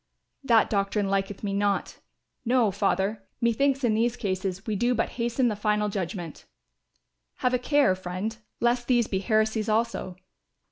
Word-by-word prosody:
"That 230 -5 +4
doctrine 200 0 0
liketh 195 +1 -2
me 200 -1 -2
not; 200 0 -1 0.4
no, 240 -3 +3
Father, 200 +1 0 0.2
methinks 270 +4 +1
in 235 -3 +3
these 235 +2 +1
cases 190 -1 -3
we 215 - -1
do 240 +4 +1
but 230 - 0
hasten 240 +2 +1
the 215 - 0
final 210 0 0
judgment." 175 -4 -5 0.9
"Have 250 -1 0
a 250 - +2
care, 280 -3 +3
friend, 185 +4 -4 0.2
lest 240 +1 +1
these 240 -2 +3
be 190 -3 -2
heresies 220 +1 +1
also." 220 -4 -1
215 Hz, 150 wpm, -26 LUFS, 195-240 Hz, 0.9 s, That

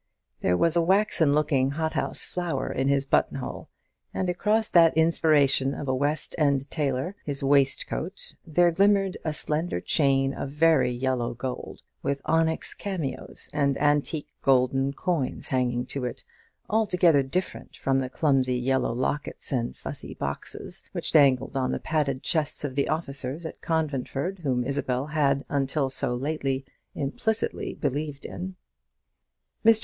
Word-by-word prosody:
There 90 - +2
was 165 - +3
a 170 - +4
waxen 185 -4 +3
looking 140 -3 +2
hothouse 160 -1 -1
flower 175 -7 -2
in 135 +1 0
his 140 0 +2
button 135 - +2
hole, 130 - -6 0.5
and 185 - 0
across 210 +5 +1
that 165 -2 +5
inspiration 150 -4 +3
of 145 - -5
a 130 - +1
West 145 +3 0
end 140 -2 +2
tailor, 145 +4 -1
his 140 -2 -4
waistcoat, 140 +6 0
there 175 +1 +3
glimmered 195 +1 +3
a 155 - -1
slender 155 +3 -1
chain 135 -3 +2
of 135 - -4
very 155 -2 +3
yellow 125 -1 -1
gold, 125 +1 -6 0.2
with 140 0 -1
onyx 160 0 +1
cameos 175 -10 -4
and 140 -2 +1
antique 145 +1 +1
golden 135 +1 +3
coins 155 -2 -2
hanging 125 -1 0
to 135 -3 -4
it, 125 - -5 0.4
altogether 180 -8 +3
different 135 +8 -4
from 135 -1 +1
the 130 -1 -2
clumsy 130 -3 +2
yellow 130 0 +1
lockets 130 +4 -2
and 120 -3 -1
fusee - - -6
boxes - - -4
which - - -1
dangled 135 -3 +4
on 130 -1 0
the - - -2
padded 145 -4 -1
chests 155 -4 0
of 140 -3 -3
the 140 +1 0
officers 145 -1 -3
at 160 - -7
Conventford, 160 +2 -2
whom 130 -6 0
Isabel 130 -1 -1
had 140 -2 +1
until 140 -1 0 0.3
lately 135 -1 -2
so - - -12
implicitly 215 +11 -2
believed 145 +1 -3
in. 185 +1 -6 1.1
Mr. 225 -1 +6
140 Hz, 145 wpm, -26 LUFS, 135-160 Hz, 1.1 s, Mr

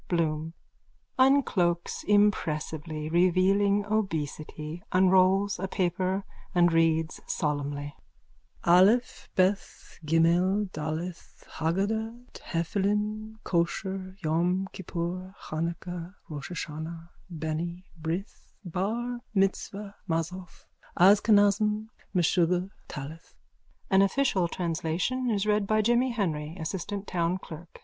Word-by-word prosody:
_ - - -30
BLOOM: 160 0 -1 0.7
(Uncloaks 215 -11 +2
impressively, 160 -6 +1
revealing 190 +4 +3
obesity, 160 -5 -3
unrolls 190 +1 +4
a 190 - -2
paper 185 +1 0 0.3
and 175 -1 +5
reads 160 -1 +2
solemnly.) 145 -1 -2 0.7
Aleph 195 +8 +4
Beth 190 +2 0
Ghimel 175 +5 +2
Daleth 160 +3 -5 0.2
Hagadah 215 +8 -1
Tephilim 210 +5 -1
Kosher 185 +2 -1
Yom 175 +4 +1
Kippur 185 +1 -4
Hanukah 170 +3 -4 0.2
Roschaschana 160 +2 -6 0.2
Beni 170 +2 -4 0.2
Brith 170 +5 -5
Bar 225 +8 -2 0.2
Mitzvah 195 +1 0 0.2
Mazzoth 170 +2 -3 0.3
Askenazim 205 +2 +4 0.3
Meshuggah 180 +1 +2 0.2
Talith. 150 +3 -8 0.6
_(An 190 0 +6
official 195 -4 +2
translation 175 +9 -1
is 205 -2 +1
read 210 -1 +2
by 215 +1 +3
Jimmy 240 +3 +3
Henry, 165 -8 -2
assistant 195 +4 -4
town 175 -1 0
clerk.) 170 -2 -11
180 Hz, 90 wpm, -28 LUFS, 165-200 Hz, 0.7 s, An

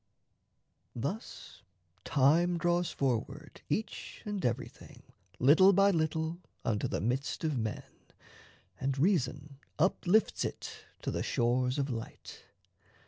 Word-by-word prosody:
Thus 145 - -6 0.4
time 165 +6 +3
draws 175 0 +1
forward 135 +3 -3
each 220 0 -4
and 205 -2 -3
everything 120 +1 -4 0.3
Little 165 +10 +6
by 195 +1 +5
little 160 0 -1 0.3
unto 105 -2 0
the - - -2
midst 125 +9 -2
of 155 -3 0
men, 110 -1 -3 1.0
And 135 +1 -1
reason 145 -4 0 0.2
uplifts 185 +5 +2
it - - -6 0.2
to - - -1
the - - -2
shores 125 +2 +1
of 140 -1 -1
light. 115 -2 -8
150 Hz, 110 wpm, -31 LUFS, 130-175 Hz, 1.0 s, Little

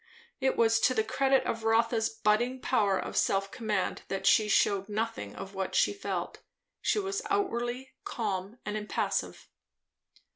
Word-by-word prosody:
It 265 -1 +1
was 225 -1 +4
to 255 +2 +3
the 220 - +2
credit 270 +3 +2
of 225 0 -2
Rotha's 225 0 +2
budding 225 +4 +1
power 200 -5 +2
of - - -5
self 195 0 +1
command 215 -5 -2
that 195 - -3
she 215 - +5
shewed 200 -1 +2
nothing 215 - -3
of 195 +1 -8
what 190 -1 -3
she - - +3
felt. 400 - -4 0.4
She - - +1
was 395 +1 -1
outwardly 260 - -1
calm 200 -1 -3
and 210 - -3
impassive. 210 0 -2
225 Hz, 150 wpm, -29 LUFS, 205-250 Hz, 0.4 s, she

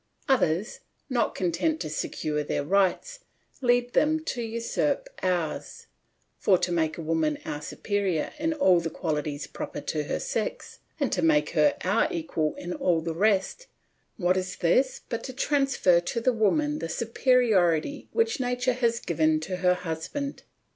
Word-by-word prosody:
Others, 210 - +1 0.3
not 245 -2 +1
content 170 -3 0
to 160 - -3
secure 150 0 -2
their 145 - -2
rights, 200 - +1 0.4
lead 245 -1 +2
them 310 +1 +3
to 245 - -2
usurp 235 - -1
ours; 175 -4 -2 0.5
for 190 - +4
to 175 - -1
make 160 -2 0
woman 160 -2 0
our 150 - -4
superior 195 0 -2
in 320 +1 0
all 190 - +4
the 165 -1 -3
qualities 150 -3 -3
proper - - -6
to 150 -1 -3
her - - -2
sex, 220 - -4 0.2
and 280 -4 0
to 180 - 0
make 150 -2 +3
her 155 -3 +3
our 185 +2 +2
equal 160 -2 -2
in 175 0 -5
all 170 -3 +1
the 165 0 -3
rest, 205 - +1 0.5
what 180 -2 +2
is 185 0 -3
this 255 +10 +2
but 230 -1 -4
to 260 - -6
transfer 270 -10 +2
to 175 +7 -3
the 250 +2 +2
woman 295 +8 +1
the 165 - -4
superiority 230 - +2
which 455 -7 +1
nature 250 0 0
has 235 -2 +1
given 155 -2 +1
to 185 +3 -4
her 180 0 +3
husband? 180 - -4
185 Hz, 155 wpm, -27 LUFS, 165-245 Hz, 0.5 s, for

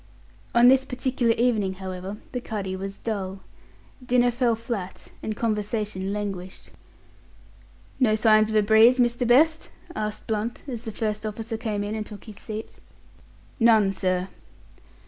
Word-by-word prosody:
On 240 +1 +7
this 265 +1 +6
particular 250 -2 0
evening, 225 -5 +1
however, 190 +1 -6
the 250 - -3
cuddy 200 -5 -4
was 195 +1 -6
dull. 195 -3 -4 0.6
Dinner 245 0 +3
fell 240 -1 +1
flat, 225 -5 -6
and 215 -1 -4
conversation 210 -3 -2
languished. 195 -3 -5 1.3
"No 225 -5 +4
signs 215 -1 +4
of 220 - -2
a 215 - +5
breeze, 220 +4 +6
Mr. 240 0 +2
Best?" 310 +6 +4 0.3
asked 210 -1 -4
Blunt, 220 +2 -3
as 240 -4 -5
the 220 - -4
first 215 -1 -2
officer 220 +1 -4
came 220 -3 -2
in 205 +1 -3
and 220 -1 -2
took 210 -2 -10
his 215 -3 -10
seat. 215 0 -7 0.8
"None, 220 -4 +5
sir." 185 0 -1
215 Hz, 145 wpm, -25 LUFS, 205-235 Hz, 1.3 s, On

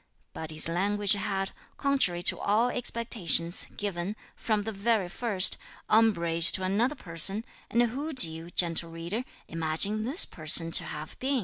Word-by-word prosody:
But 160 - -8
his 155 0 +2
language 200 +4 +1
had, 195 -1 -3 0.3
contrary 265 -12 0
to - - +2
all 220 +4 +1
expectations, 205 - +1
given, 200 0 -4 0.2
from 215 -2 -2
the 220 - -5
very 205 -2 -1
first, 200 -2 +2 0.3
umbrage 170 -7 +4
to 190 - -2
another 220 +9 0
person, 195 - 0 0.2
and 235 +1 +2
who 270 +7 -4
do 260 - +8
you, 160 +1 -9
(gentle 170 -1 +1
reader,) 170 +8 -5 0.2
imagine 165 +7 -2
this 275 - +1
person 165 +1 0
to - - +5
have 150 +1 -9
been? 270 0 -1
195 Hz, 150 wpm, -27 LUFS, 170-225 Hz, 0.3 s, do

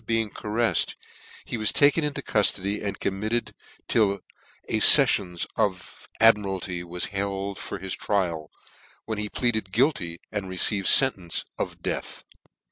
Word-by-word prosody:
being 115 -2 0
carcflrd, 110 -3 -1 0.5
he - - -5
was 110 -1 +2
taken 145 +3 +3
into 145 -1 -4
cuftody, 100 -1 0
and 100 -1 -5
committed 110 +5 -3 0.3
till 100 -3 +1 0.5
a - - -1
ftflions 90 -3 +7
of 90 -3 -3
Admiralty 95 -5 +1
was 90 +1 -3
he 100 - -8
Id 100 0 -3
for - - -7
his 95 0 -5
trial, 85 -6 -2 0.6
when 110 -2 -5
he 105 0 -4
pleaded 110 -6 -2
guilty, 105 - 0
and 100 -3 -5
received 95 +1 0
fentence 95 -11 +3
of - - -6
death. - - -5
100 Hz, 135 wpm, -24 LUFS, 95-110 Hz, 0.6 s, ftflions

